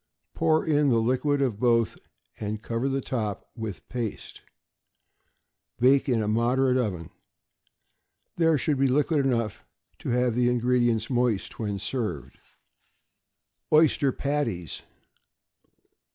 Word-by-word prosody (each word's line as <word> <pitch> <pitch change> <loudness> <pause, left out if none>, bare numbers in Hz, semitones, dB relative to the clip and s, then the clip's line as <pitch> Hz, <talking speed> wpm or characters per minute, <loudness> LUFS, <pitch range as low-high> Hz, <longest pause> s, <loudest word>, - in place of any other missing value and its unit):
Pour 160 -1 +2
in 150 -2 +3
the 120 - +3
liquid 130 +5 +1
of 115 -6 -1
both, 115 -2 +2 0.4
and 105 +1 -4
cover 115 +4 -2
the 135 0 -1
top 110 -6 -3
with 110 -6 -7
paste. 120 -4 -5 1.4
Bake 135 +3 +4
in 115 -3 +2
a - - -2
moderate 125 +4 +2
oven. 95 -10 -2 1.2
There 165 -2 +3
should 140 +1 0
be 135 - +4
liquid 145 +2 +2
enough 115 -5 -1 0.4
to - - -5
have 125 0 +1
the 120 +1 +2
ingredients 120 -1 +1
moist 120 -5 0
when 105 -3 -2
served. 95 - -4 1.3
=Oyster 150 -3 +4
Patties. 130 - -3
125 Hz, 115 wpm, -26 LUFS, 110-135 Hz, 1.4 s, Bake